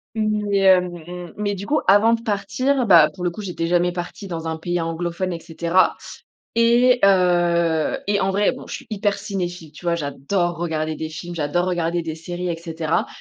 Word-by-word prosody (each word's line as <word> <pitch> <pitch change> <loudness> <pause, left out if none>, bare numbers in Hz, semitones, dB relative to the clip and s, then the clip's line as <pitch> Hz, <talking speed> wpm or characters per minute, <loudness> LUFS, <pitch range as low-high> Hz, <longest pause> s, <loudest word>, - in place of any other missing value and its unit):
Mais, 210 -2 0
hem, 185 -2 +5
mmh, 175 +1 -9
mais 205 -1 -1
du 195 +2 -7
coup, 300 - +2
avant 205 +4 +6
de 230 - -8
partir, 225 +5 0
bah, 165 -5 +7
pour 180 - -8
le 175 - +2
coup, 190 - -8
j'étais 175 -4 -3
jamais 175 0 +2
partie 180 +3 -6
dans 165 -3 -5
un 160 0 -3
pays 175 +2 -2
anglophone 170 +2 -3
et 165 - -5
cetera. 170 +3 +1 0.6
Et 240 +2 +4
heu, 175 -4 +3
et 205 0 +2
en 190 - +1
vrai, 200 +1 +2
bon, - - -10
je - - -7
suis - - -11
hyper 205 -2 -1
cinéphile, 180 -6 -5
tu 155 +3 -13
vois? 170 - +2
J'adore 170 +4 -2
regarder 160 -2 -2
des 160 +1 -5
films, 170 +2 -7
j'adore 165 +3 0
regarder 175 -1 -1
des 160 -1 -4
séries, 175 +2 -5
et 170 - -2
cetera. 165 -1 -2
175 Hz, 200 wpm, -21 LUFS, 165-200 Hz, 0.6 s, bah